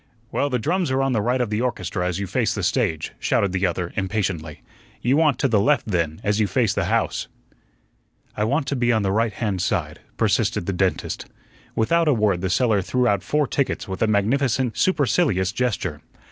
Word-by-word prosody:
"Well, 145 - 0
the 125 - 0
drums 170 - 0
are 130 +1 +1
on 135 -1 +1
the 110 - +1
right 125 +4 0
of 120 -4 -1
the 105 +2 0
orchestra 90 -7 -2
as 90 -1 -2
you 100 - -2
face 115 +4 0
the 100 - -3
stage," 95 - 0
shouted 100 -2 +1
the 95 +1 +1
other 85 0 -3
impatiently; 95 -6 -2 0.4
"you 125 +3 +3
want 150 -4 +3
to 140 - +1
the 110 -5 +3
left, 145 +8 +2
then, 85 -6 -1
as 105 +1 +1
you 105 - +2
face - - +1
the - - 0
house." - - 0 1.1
"I 105 - -1
want 140 +6 0
to 140 - -1
be 120 -1 +2
on 110 -3 +1
the 95 - 0
right 110 +2 +1
hand 100 -6 -2
side," 85 -6 -1 0.2
persisted - - +1
the 95 - -1
dentist. 95 +1 -1 0.5
Without 165 +9 +2
a 145 - +4
word 105 -5 +1
the 95 - -1
seller 105 +1 +2
threw 125 +6 0
out 100 -4 +2
four 150 - +1
tickets 140 0 -1
with 95 0 -5
a 115 - +3
magnificent, 120 +4 +1
supercilious 125 - +2
gesture. 105 - -2
110 Hz, 205 wpm, -23 LUFS, 95-130 Hz, 1.1 s, a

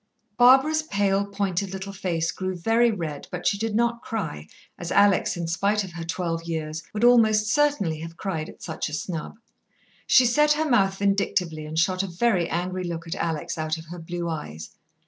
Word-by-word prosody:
Barbara's 270 +6 +5
pale, 200 -7 0
pointed 200 -1 -2
little 195 +1 -6
face 170 -4 -1
grew 185 0 -4
very 225 +7 +3
red, 165 -9 -4
but 180 -1 -6
she - - +3
did 225 -1 -2
not 235 +1 +1
cry, 80 - -5 0.3
as 175 - -5
Alex, 200 -2 +3
in 170 - -3
spite 200 +5 +1
of 190 - -8
her 170 -1 -6
twelve 165 0 -2
years, 160 -1 -4
would 215 +2 -3
almost 220 -3 +5
certainly 260 - +1
have 165 +1 -8
cried 165 -6 -3
at - - -14
such 160 -2 -4
a - - -10
snub. 160 +1 -4 0.7
She 255 - +6
set 300 +5 +4
her 310 +1 -1
mouth 195 -7 +2
vindictively 185 -6 0
and 155 +1 -6
shot 185 +3 +2
a 195 - -3
very 180 -1 +1
angry 185 +2 -2
look 170 -1 -5
at 165 - -4
Alex 165 0 -3
out 155 0 -1
of 160 - -10
her 175 - -7
blue 170 +1 -4
eyes. 80 - -6
185 Hz, 190 wpm, -25 LUFS, 165-210 Hz, 0.7 s, She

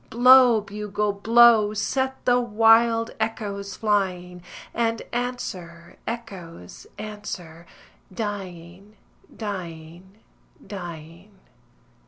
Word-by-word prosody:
Blow, 245 -1 +6
bugle, 210 0 -3
blow, 220 0 +5
set 265 +4 -2
the 245 0 +4
wild 230 0 +3
echoes 205 -3 -4
flying, 180 -4 -1 0.3
And 230 -1 -1
answer, 185 -9 -5
echoes, 190 - -8
answer, 190 -6 -8 0.4
dying, 195 -1 -7 0.4
dying, 180 -2 -8 0.5
dying. 170 0 -9
205 Hz, 75 wpm, -24 LUFS, 180-225 Hz, 0.5 s, Blow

